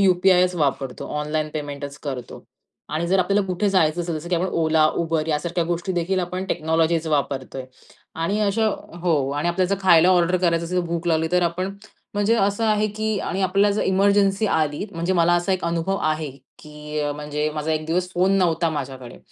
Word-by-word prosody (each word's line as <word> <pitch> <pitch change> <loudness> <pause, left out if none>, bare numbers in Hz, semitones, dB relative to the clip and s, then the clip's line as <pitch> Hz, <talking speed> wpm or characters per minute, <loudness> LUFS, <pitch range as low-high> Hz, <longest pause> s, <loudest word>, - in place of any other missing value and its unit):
यू-पी-आयच 180 -1 +4
वापरतो. 140 -5 -2
ऑनलाईन 155 +1 -2
पेमेंटच 145 -1 -5
करतो. 130 -5 -6 0.4
आणि 155 +3 -2
जर 190 +2 +3
आपल्याला 200 +2 +2
कुठे 185 +3 0
जायचं 175 -3 +2
असेल 170 -1 -3
जसं, 170 +3 -9
की 180 - +1
आपण 175 +2 0
Ola, 160 -1 +3
Uber 165 -2 0
यासारख्या 170 +3 -1
गोष्टी 175 +3 -2
देखील 180 +2 0
आपण 180 +1 -3
टेक्नॉलॉजीज 160 -1 0
वापरतोय. 135 -3 -2 0.5
आणि 165 +6 -1
अशा 215 +2 +1 0.4
हो 150 -6 +1
आणि 145 +4 -1
आपल्या 180 +2 +1
जर 200 +2 0
खायला 175 -2 +6
ऑर्डर 180 0 +3
करायचं 170 -2 +1
असेल 180 +2 -3
तर - - -4
भूक 170 +1 -3
लावली 160 -1 +1
तर 180 0 +3
आपण, 180 +3 -1 0.4
म्हणजे 205 +2 +2
असं 205 0 +1
आहे 215 -1 +2
की 215 -1 -1
आणि 195 - -3
आपल्याला 195 +2 +3
जर - - +1
एमर्जन्सी 200 +2 +2
आली. 155 -2 0
म्हणजे 170 +1 -1
मला 175 -1 +3
असा 175 +2 +1
एक 185 -2 -2
अनुभव 170 +3 -1
आहे, 155 -1 -1 0.3
की 150 0 -6
म्हणजे 150 +1 -3
माझा 155 +1 -2
1 155 0 -1
दिवस 180 +3 0
फोन 185 +2 +2
नव्हता 170 -2 +1
माझ्याकडे. 135 -4 -6
170 Hz, 185 wpm, -22 LUFS, 155-185 Hz, 0.5 s, खायला